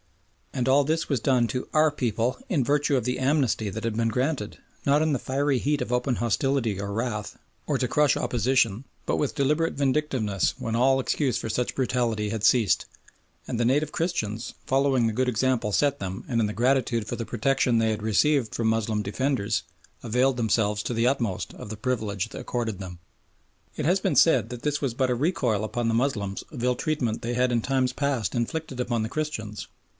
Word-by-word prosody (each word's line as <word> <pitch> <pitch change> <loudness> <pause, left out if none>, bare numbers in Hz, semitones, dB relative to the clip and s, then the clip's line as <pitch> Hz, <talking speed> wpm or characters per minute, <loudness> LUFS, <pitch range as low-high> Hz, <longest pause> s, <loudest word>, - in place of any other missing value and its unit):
And 125 -1 -1
all 140 +2 +5
this 160 +3 0
was 140 -4 0
done 125 0 +2
to 125 +4 -3
"Our 155 0 +4
people" 120 -3 -1
in 150 -8 +2
virtue 145 +1 +2
of 125 - -1
the 125 +2 -1
"Amnesty" 130 -6 +1
that 110 +3 -6
had 115 -2 -1
been 115 0 +1
granted, 125 -2 -1 0.3
not 145 +2 +4
in 155 -1 +2
the 135 - 0
fiery 135 0 0
heat 145 +2 0
of 125 - -2
open 125 +1 +1
hostility 120 -2 0
or 100 0 -4
wrath, 110 -1 -3 0.3
or - - +1
to - - 0
crush 150 -2 +3
opposition, 120 -1 +1 0.2
but - - 0
with 145 - -1
deliberate 150 +4 +1
vindictiveness 130 - 0
when 115 0 -3
all 135 +3 +4
excuse 130 -1 0
for 115 - -4
such 125 +3 -1
brutality 120 -5 0
had 110 -1 -3
ceased. 110 -5 +3 0.6
And 120 - -3
the 120 - +2
native 145 +5 +2
Christians, 115 - -2
following 135 -2 +2
the 110 - -1
good 130 +3 +1
example 120 -2 0
set 140 +6 +2
them 95 0 -5
and 115 -2 +1
in 105 - +2
gratitude 120 0 +1
for - - -3
the 115 - -4
protection 125 +1 +1
they 110 -1 +2
had 105 -1 -3
received 120 +3 +2
from 115 - 0
Moslem 110 -1 0
defenders, 115 +1 -1 0.4
availed 125 +3 +2
themselves 105 -3 +1
to - - -2
the 115 +1 +2
utmost 120 -8 -1
of - - -9
the 110 - -6
privilege 110 -5 -2
accorded 115 -5 -3
them. 90 -3 -8 0.8
It 150 - -2
has 180 +5 +3
been - - 0
said 125 -9 +4
that 120 -1 -7
this 150 0 0
was 135 -5 -1
but 130 0 +1
a - - +2
recoil 125 - 0
upon 115 +2 -2
the 115 - +1
Moslems 115 -6 -1
of 125 -6 -6
ill 125 0 +2
treatment 125 -7 -1
they 120 +1 -2
had 125 0 +2
in 120 -1 +1
times 130 0 0
past 135 -8 -1
inflicted 130 +3 -3
upon 120 -3 0
the 110 - -3
Christians. 110 -9 -4
125 Hz, 200 wpm, -26 LUFS, 110-135 Hz, 0.8 s, all